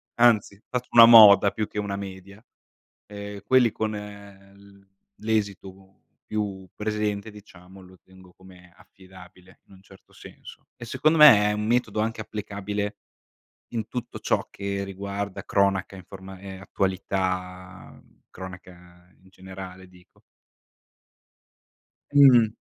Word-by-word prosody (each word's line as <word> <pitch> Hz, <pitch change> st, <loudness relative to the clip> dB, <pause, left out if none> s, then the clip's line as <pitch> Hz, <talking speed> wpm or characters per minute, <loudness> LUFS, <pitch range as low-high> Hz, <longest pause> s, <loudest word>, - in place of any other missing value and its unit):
Anzi, 110 Hz, -4 st, +2 dB
faccio 125 Hz, 0 st, -4 dB
una 115 Hz, -1 st, +9 dB
moda 105 Hz, -4 st, +8 dB
più 110 Hz, -1 st, -4 dB
che -, -, -11 dB
una 100 Hz, -1 st, -4 dB
media, 100 Hz, +2 st, -10 dB, 0.6 s
ehm, 100 Hz, 0 st, -9 dB
quelli 120 Hz, 0 st, +3 dB
con 110 Hz, -1 st, -3 dB
l 100 Hz, -1 st, -13 dB, 0.3 s
l'esito 95 Hz, -3 st, -4 dB, 0.2 s
più 100 Hz, -3 st, -4 dB
presente, 105 Hz, 0 st, -3 dB
diciamo, 95 Hz, -2 st, -16 dB
lo 90 Hz, 0 st, -18 dB
tengo 95 Hz, -1 st, -19 dB
come 90 Hz, -1 st, -18 dB
affidabile, 95 Hz, -1 st, -18 dB
in -, -, -22 dB
un 95 Hz, -, -19 dB
certo 95 Hz, -1 st, -20 dB
senso. -, -, -14 dB
E 120 Hz, -, -10 dB
secondo 155 Hz, +7 st, +1 dB
me 110 Hz, -9 st, +7 dB
è -, -, 0 dB
un 105 Hz, 0 st, -3 dB
metodo 115 Hz, -3 st, 0 dB
anche 110 Hz, 0 st, -3 dB
applicabile 105 Hz, -1 st, -5 dB, 0.8 s
in 110 Hz, -2 st, -4 dB
tutto 125 Hz, -3 st, -7 dB
ciò -, -, -1 dB
che 100 Hz, 0 st, -4 dB
riguarda 100 Hz, 0 st, -6 dB
cronaca, 100 Hz, -1 st, 0 dB
informa 95 Hz, 0 st, -12 dB
ehm, 95 Hz, -1 st, -10 dB
attualità, 95 Hz, -1 st, -4 dB, 0.3 s
cronaca 90 Hz, -1 st, -13 dB
in 95 Hz, -, -22 dB
generale 95 Hz, 0 st, -11 dB
dico. 90 Hz, -1 st, -23 dB, 1.9 s
Mh. 125 Hz, -6 st, +6 dB
100 Hz, 120 wpm, -24 LUFS, 95-105 Hz, 1.9 s, una